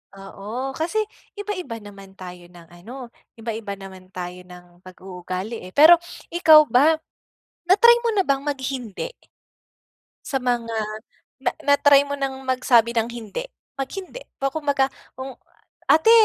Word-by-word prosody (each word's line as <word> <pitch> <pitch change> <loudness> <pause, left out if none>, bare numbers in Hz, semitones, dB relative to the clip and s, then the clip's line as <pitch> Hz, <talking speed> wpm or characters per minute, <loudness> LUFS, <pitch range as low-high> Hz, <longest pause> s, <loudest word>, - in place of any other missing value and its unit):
Oo. 215 +7 -6
Kasi 335 +7 -1 0.4
iba-iba 365 - -5
naman 200 -2 -13
tayo 180 -1 -9
ng 170 -2 -15
ano, 230 +10 -10 0.3
iba-iba 220 -3 -5
naman 190 -1 -12
tayo 180 0 -7
ng 180 0 -16
pag-uugali 185 +3 -7
eh. 185 - -10
Pero 310 - +8 0.3
ikaw 315 -3 +6
ba, 295 +7 +4 0.7
na-try 470 +6 +7
mo - - +3
na 395 - +3
bang 275 -5 0
mag 290 - +1
hindi? 255 - -4 1.1
Sa 270 - -2
mga 240 -2 -1 0.7
na 245 - +2 0.2
na-try 285 0 +5
mo 285 - -3
ng 270 -1 -4
magsabi 245 -2 +3
ng 230 0 0
hindi? 235 - -6 0.3
Mag 270 -1 -4
hindi. 390 +6 -8 0.2
Ba 275 - -1
kumbaga, 285 -3 +1 0.3
kung 260 0 -6 0.6
“Ate, 320 +8 +6
245 Hz, 135 wpm, -23 LUFS, 195-285 Hz, 1.1 s, Pero